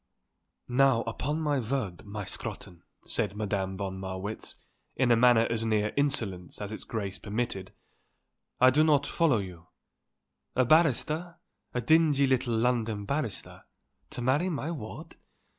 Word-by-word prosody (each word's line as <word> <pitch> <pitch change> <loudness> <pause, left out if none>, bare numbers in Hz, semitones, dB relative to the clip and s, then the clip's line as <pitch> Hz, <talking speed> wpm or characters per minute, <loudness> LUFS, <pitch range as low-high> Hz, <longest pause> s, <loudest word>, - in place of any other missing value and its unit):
"Now 125 -1 +4
upon 145 +7 -2
my 145 -3 +1
word, 115 -7 -3
my 105 0 -5
Scrotton," 85 -1 -7 0.2
said 100 - -2
Madame 100 -3 -2
von 95 -1 -4
Marwitz 95 +3 -5 0.4
in 125 -2 +2
a - - +7
manner 115 -1 +5
as 115 -1 0
near 110 -1 +1
insolence 110 -11 0
as 105 0 -5
its 110 - -7
grace 105 -3 -4
permitted, 105 -3 -3 0.9
"I 130 0 +7
do 150 +4 +4
not 145 -3 +3
follow 160 -7 +2
you. 90 -4 -7 0.9
A 130 - +3
barrister, 160 +3 +2 0.4
a 125 - +1
dingy 150 +1 +4
little 130 -3 +1
London 115 -3 0
barrister, 140 -5 -4 0.4
to 125 - -5
marry 145 +9 +2
my 160 -1 -3
ward? 110 -10 -8
120 Hz, 140 wpm, -29 LUFS, 105-140 Hz, 0.9 s, a